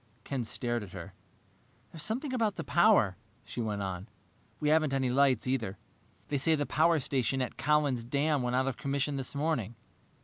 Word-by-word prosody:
Ken 135 -3 -2
stared 120 +1 -2
at 100 -4 -9
her. - - -8 0.8
"There's 160 - -8
something 260 - -1
about 225 -5 +1
the - - -4
power," 170 - +4 0.3
she 120 - -5
went 105 -3 -2
on. 95 +1 -4 0.5
"We 150 - +1
haven't 155 -3 +3
any 130 -2 +1
lights, 135 -3 +3
either. 115 -7 -1 0.5
They 145 - 0
say 160 +4 +3
the 145 -1 -1
power 160 +3 +3
station 135 -2 0
at 130 - -2
Collin's 145 -4 +1
Dam 140 +4 +1
went 125 0 -1
out 130 +1 +2
of 130 -3 -2
commission 140 +1 -1
this 135 +1 -3
morning. 140 -7 -1
135 Hz, 180 wpm, -30 LUFS, 120-150 Hz, 0.8 s, power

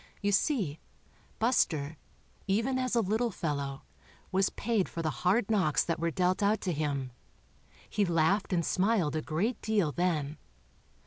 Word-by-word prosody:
You 205 -1 0
see. 195 - +1 0.6
Buster, 160 - +1 0.5
even 230 +7 +1
as 255 -1 0
a 235 - +4
little 220 +4 0
fellow, 140 -7 -3 0.5
was 190 0 +2
paid 220 -4 -1
for 165 - -4
'the 155 - 0
hard 200 +4 +2
knocks 185 -8 +3
that 165 -1 -2
were 170 0 +1
dealt 180 +4 +1
out 205 +1 +3
to 180 - -1
him. 140 -4 -2 0.8
He 210 - 0
laughed 175 +3 +2
and 170 -3 +1
smiled 190 -6 +1
a 155 - 0
great 200 +11 -1
deal 205 -8 +1
then. 155 -4 -1
185 Hz, 150 wpm, -30 LUFS, 155-215 Hz, 0.8 s, a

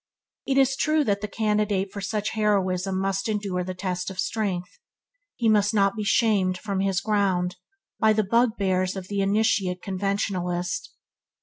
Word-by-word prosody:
It 270 -1 +1
is 270 -1 +4
true 310 +2 +2
that 200 -5 0
the 210 - -3
candidate 210 -2 0
for 200 - -5
such 210 +1 -2
heroism 195 -3 0
must 195 +2 -1
endure 200 -4 -1
the 185 +1 -5
test 180 0 -3
of 190 - -9
strength. 190 -5 -2 0.6
He 235 - 0
must 210 0 +3
not 195 0 +3
be 215 - -3
shamed 205 -4 +2
from 200 0 -3
his 195 -1 +1
ground 195 -4 0 0.4
by 220 -1 +4
the 215 0 +2
bugbears 195 -4 +1
of 190 -1 -5
an 200 - -1
initiate 195 -3 +1
conventionalist. 185 -2 -2
200 Hz, 155 wpm, -25 LUFS, 185-215 Hz, 0.6 s, is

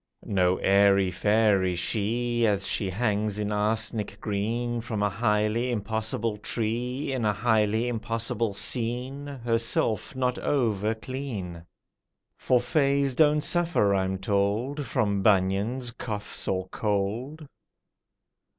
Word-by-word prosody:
No 90 -2 +2
airy 100 -1 +4
fairy 100 -2 +2
she, 115 +5 0
As 100 -2 +1
she 100 -1 0
hangs 105 0 -1
in 105 0 -2
arsenic 105 0 -1
green 115 +4 -2
From 110 -3 -3
a 105 - +2
highly 105 +4 0
impossible 110 0 -2
tree 120 +6 -1
In 130 -3 -2
a 105 - +3
highly 110 +2 +1
impossible 115 -2 -2
scene 125 +6 -1
(Herself 115 -2 -1
not 125 -1 0
over 110 -6 0
clean). 110 -9 -6 0.7
For 125 - +2
fays 140 0 +1
don't 150 +2 +4
suffer, 170 - +2
I'm 95 0 0
told, 105 +9 -1
From 100 -2 0
bunions, 105 +5 +1
coughs, 110 -3 -4
or 95 -1 -1
cold. 110 +11 -2
110 Hz, 115 wpm, -26 LUFS, 100-120 Hz, 0.7 s, airy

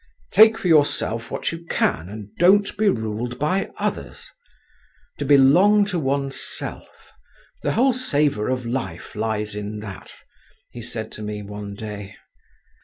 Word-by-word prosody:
"Take 220 +1 +7
for - - -3
yourself 145 -7 +2
what - - -2
you 165 0 -8
can, 80 - 0
and 105 0 -10
don't 200 +4 +4
be 210 0 +2
ruled 110 - -3
by 155 +8 0
others; - - -4 0.9
to - - -2
belong 175 +10 +5
to 185 -4 -1
oneself—the 140 -1 -4
whole 255 +3 +3
savour 145 - +1
of 130 -1 -2
life 115 -9 -5
lies 105 -1 -2
in 105 0 -5
that," 100 -3 -9 0.6
he 120 - -9
said 110 -1 -4
to - - -9
me 105 0 -5
one 100 0 -7
day. 105 -2 -8
120 Hz, 135 wpm, -22 LUFS, 105-165 Hz, 0.9 s, Take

